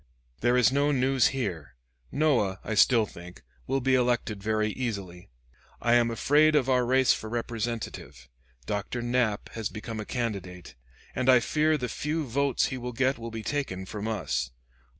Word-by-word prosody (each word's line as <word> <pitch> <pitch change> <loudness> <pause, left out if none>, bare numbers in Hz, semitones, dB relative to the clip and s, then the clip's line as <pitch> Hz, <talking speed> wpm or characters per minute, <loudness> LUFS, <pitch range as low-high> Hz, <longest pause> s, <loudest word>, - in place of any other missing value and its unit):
There 120 +1 +2
is 125 0 +5
no 140 +2 +2
news 130 -1 +3
here. 95 - -4 0.4
Noah, 125 -11 +1
I 110 - -3
still 115 +1 +5
think, 90 -2 -12 0.2
will 135 +1 0
be 130 +1 +2
elected 120 -5 +1
very 110 0 0
easily. 100 -8 -5 0.5
I 120 - +2
am 120 -1 +4
afraid 150 +7 +3
of 135 -4 +3
our 125 -1 +3
race 130 0 +4
for 110 - -6
representative. 115 - -4 0.4
Dr. 105 +4 -3
Knapp 120 -4 0
has 110 -3 -4
become 110 +1 -6
a 105 - -5
candidate; 95 - -4 0.4
and 130 0 0
I 130 -1 +8
fear 155 +5 +1
the 125 -3 -3
few 150 +6 -2
votes 135 +1 +1
he 130 - -4
will 125 0 -5
get 130 +2 +1
will 115 0 -6
be 110 -1 -6
taken 105 -11 -3
from 105 +2 -5
us. 65 - -2
120 Hz, 170 wpm, -27 LUFS, 105-130 Hz, 0.5 s, I